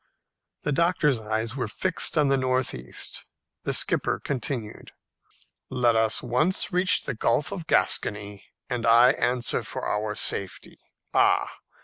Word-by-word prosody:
The 150 - -1
doctor's 150 -4 +2
eyes 110 +2 -3
were 125 -5 -2
fixed 170 - -1
on 150 -2 +4
the 135 - +3
north 130 -1 0
east. - - -5 0.4
The - - 0
skipper - - +1
continued, 125 -5 -4 0.8
"Let 125 -3 +2
us 110 -1 +2
once 155 - +1
reach 180 +1 +3
the 135 - -3
Gulf 120 - 0
of 175 -5 -6
Gascony, 100 -1 0 0.2
and 120 -2 -2
I 120 +2 +7
answer 125 -2 -1
for - - -5
our 105 0 -2
safety. 100 -2 -2 0.3
Ah! - - +2
125 Hz, 135 wpm, -25 LUFS, 110-140 Hz, 0.8 s, I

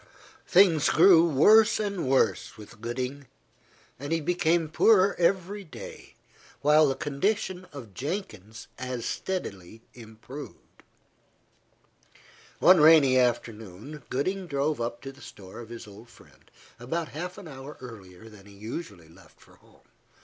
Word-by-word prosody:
Things 175 -5 +4
grew 170 0 +6
worse 215 - +5
and 200 -8 -3
worse 130 -3 +1
with 105 0 -14
Gooding, 130 +4 -5 0.7
and 145 +3 -6
he 165 - +1
became 170 0 +1
poorer 195 +4 +4
every 190 +3 0
day, 160 - -12 0.5
while 150 +1 +5
the 135 - -1
condition 185 +6 -2
of 125 -9 -11
Jenkins 115 - -6
as 125 -2 -5
steadily 110 - -5
improved. 120 +5 -12 1.8
One 185 -1 +6
rainy 150 -4 +6
afternoon, 115 +1 -2
Gooding 185 +8 -2
drove 145 -2 -1
up 120 0 -4
to 135 - -7
the 140 +1 -19
store 95 0 -12
of 115 -2 -10
his 115 -1 -9
old 105 +3 -14
friend, 75 -11 -21 0.3
about 160 +7 -4
half 180 +5 -7
an 200 -4 -10
hour 135 0 -10
earlier 105 -5 -12
than 105 -2 -15
he 100 - -15
usually 105 - -8
left 85 +4 -20
for - - -21
home. - - -25
140 Hz, 135 wpm, -27 LUFS, 115-170 Hz, 1.8 s, grew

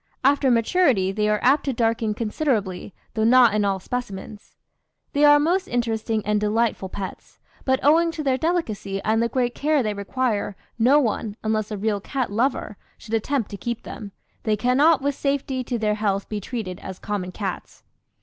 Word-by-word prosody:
After 275 0 +4
maturity 230 - +3
they 210 +1 0
are 210 0 +2
apt 275 +4 +4
to 270 - 0
darken 225 -2 0
considerably, 210 -5 -2 0.2
though 220 - 0
not 240 -1 +6
in 210 -1 +1
all 195 -1 0
specimens. 205 -2 -6 0.6
"They 290 0 +2
are 290 0 +7
most 360 +5 +1
interesting 225 -2 -1
and 210 0 +1
delightful 210 -2 0
pets. 190 0 -8 0.3
But 260 -1 +2
owing 330 +3 +5
to 310 - -4
their 265 -2 +1
delicacy 225 - -1
and 220 +1 +2
the 235 - +1
great 245 0 0
care 300 -2 +1
they 215 -1 -1
require, 205 0 -2 0.2
no 255 +6 +5
one, 220 -4 -1
unless 215 -1 0
a 210 - -4
real 205 0 -1
cat 260 0 -3
lover, 230 -2 -1 0.2
should 225 - -10
attempt 225 +1 0
to 200 - -5
keep 235 +2 -4
them; 205 -3 -8 0.3
they 215 -1 0
cannot 270 +6 +3
with 285 0 +1
safety 275 -2 -1
to 245 - -2
their 215 -1 +1
health 200 -2 -1
be 210 -1 -3
treated 200 -5 -5
as 190 -1 -8
common 195 -3 -4
cats. 190 -1 -6
225 Hz, 180 wpm, -23 LUFS, 210-265 Hz, 0.6 s, are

